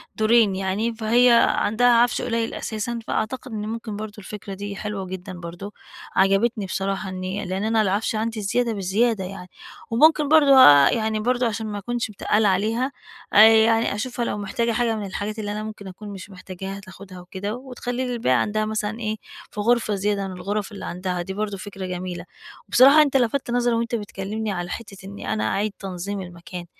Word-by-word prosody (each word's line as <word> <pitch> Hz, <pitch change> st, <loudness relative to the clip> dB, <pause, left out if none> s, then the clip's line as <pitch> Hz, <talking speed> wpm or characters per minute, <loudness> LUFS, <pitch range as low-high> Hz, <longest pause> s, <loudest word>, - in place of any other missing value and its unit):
دورين 220 Hz, -2 st, +4 dB
يعني، 195 Hz, +5 st, -1 dB
فهي 235 Hz, +3 st, +4 dB, 0.2 s
عندها 225 Hz, +4 st, +2 dB
عَفش 240 Hz, 0 st, +4 dB
قليّل 230 Hz, -1 st, -1 dB
أساسًا، 230 Hz, +2 st, -4 dB
فأعتقد 255 Hz, +4 st, -3 dB
إن 210 Hz, -1 st, -4 dB
ممكن 225 Hz, -1 st, -5 dB
برضو 215 Hz, 0 st, -6 dB
الفكرة 205 Hz, -1 st, -8 dB
دي 200 Hz, +1 st, -6 dB
حلوة 210 Hz, -1 st, -4 dB
جدًا 185 Hz, +1 st, -7 dB
برضو، 175 Hz, +4 st, -8 dB, 0.4 s
عجبتني 195 Hz, +3 st, +2 dB
بصراحة 195 Hz, +1 st, -3 dB
إني 185 Hz, +2 st, -4 dB
لإن 185 Hz, +2 st, -3 dB
أنا 220 Hz, 0 st, +2 dB
العَفش 205 Hz, +3 st, 0 dB
عندي 220 Hz, 0 st, -2 dB
زيادة 230 Hz, +3 st, 0 dB
بزيادة 205 Hz, +2 st, 0 dB
يعني. 185 Hz, -1 st, -8 dB, 0.4 s
وممكن 300 Hz, +5 st, +4 dB
برضو 295 Hz, -3 st, +6 dB
آآ، 145 Hz, -, +8 dB
يعني 220 Hz, -1 st, 0 dB
برضو 245 Hz, +2 st, +1 dB
عشان 220 Hz, -1 st, -2 dB
ما 205 Hz, -, -4 dB
أكُونش 240 Hz, +3 st, -3 dB
متقلّة 210 Hz, +1 st, +1 dB
عليها، 225 Hz, +8 st, 0 dB, 0.4 s
آآ، -, -, +6 dB
يعني 225 Hz, -1 st, +4 dB
أشوفها 245 Hz, +1 st, -3 dB
لو -, -, -2 dB
محتاجة 230 Hz, +4 st, -1 dB
حاجة 230 Hz, 0 st, +1 dB
من 210 Hz, -, -4 dB
الحاجات 205 Hz, +3 st, -4 dB
اللي 205 Hz, -1 st, -3 dB
أنا 210 Hz, +1 st, -4 dB
ممكن 215 Hz, -2 st, -8 dB
أكُون 200 Hz, +3 st, -9 dB
مش 195 Hz, 0 st, -9 dB
محتاجاها 190 Hz, +1 st, -8 dB
تاخدها 190 Hz, -1 st, -12 dB
وكده، 190 Hz, +4 st, -5 dB
وتخلّي 250 Hz, 0 st, -4 dB
لي 250 Hz, -, -3 dB
الباقي 130 Hz, -, +2 dB
عندها 215 Hz, +10 st, 0 dB
مثلًا 215 Hz, +1 st, -3 dB
إيه 215 Hz, -2 st, -2 dB, 0.4 s
في -, -, -8 dB
غرفة 225 Hz, -1 st, +2 dB
زيادة 200 Hz, 0 st, -1 dB
من 190 Hz, -, -7 dB
الغرف 200 Hz, +3 st, -3 dB
اللي 200 Hz, -, -8 dB
عندها، 180 Hz, 0 st, -3 dB
دي 190 Hz, +2 st, -5 dB
برضو 205 Hz, 0 st, -3 dB
فكرة 195 Hz, -1 st, -7 dB
جميلة. 180 Hz, -1 st, -5 dB, 0.4 s
وبصراحة 275 Hz, +5 st, +7 dB
أنت 280 Hz, -2 st, +3 dB
لَفتّ 245 Hz, 0 st, 0 dB
نظري 245 Hz, 0 st, +2 dB
وأنت 230 Hz, +1 st, -1 dB
بتكلمني 210 Hz, +1 st, -4 dB
على 175 Hz, -2 st, -4 dB
حتة 210 Hz, -2 st, -7 dB
إني 200 Hz, +1 st, -9 dB
أنا 110 Hz, -, -1 dB
أعيِد 205 Hz, -, -1 dB
تنظيم 195 Hz, +1 st, -5 dB
المكان، 175 Hz, 0 st, -9 dB
210 Hz, 185 wpm, -23 LUFS, 195-230 Hz, 0.4 s, آآ